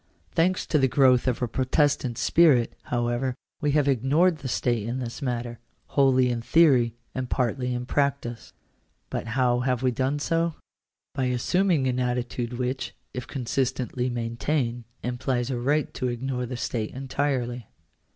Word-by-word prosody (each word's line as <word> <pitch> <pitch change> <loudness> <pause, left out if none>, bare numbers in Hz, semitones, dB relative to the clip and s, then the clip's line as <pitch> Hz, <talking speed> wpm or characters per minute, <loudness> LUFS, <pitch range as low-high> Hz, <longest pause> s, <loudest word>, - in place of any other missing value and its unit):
Thanks 180 +2 +1
to 150 - +2
the 135 - +4
growth 130 -1 +4
of 125 0 0
a - - +1
Protestant 130 0 +1
spirit, 145 -9 +4
however, 120 +1 -1 0.3
we 145 -2 +1
have 145 -2 +3
ignored 145 +7 +3
the 135 - -5
state 120 -3 0
in 120 +2 -2
this 120 +2 -5
matter 120 -3 -3 0.2
— - - -44
wholly 130 -2 +4
in 120 -1 -2
theory, 125 -5 +4 0.2
and 130 -1 -3
partly 125 0 0
in 120 0 -3
practice. 140 -4 -1 0.6
But - - -3
how 125 -2 +3
have 125 0 0
we 130 - +3
done 130 +4 0
so? 165 +2 0 0.6
By 135 -2 -1
assuming 150 +5 +1
an 125 -1 0
attitude 125 -1 -2
which, 125 +2 -3 0.2
if 125 - -5
con 130 -3 -5
sistently 125 0 -1
maintained, 120 +1 -2 0.2
implies 125 0 -1
a 125 - -2
right 145 +4 0
to 130 - -2
ignore 125 +1 -3
the 125 0 -5
state 115 -2 -3
entirely. 130 -3 -2
125 Hz, 160 wpm, -26 LUFS, 120-140 Hz, 0.6 s, the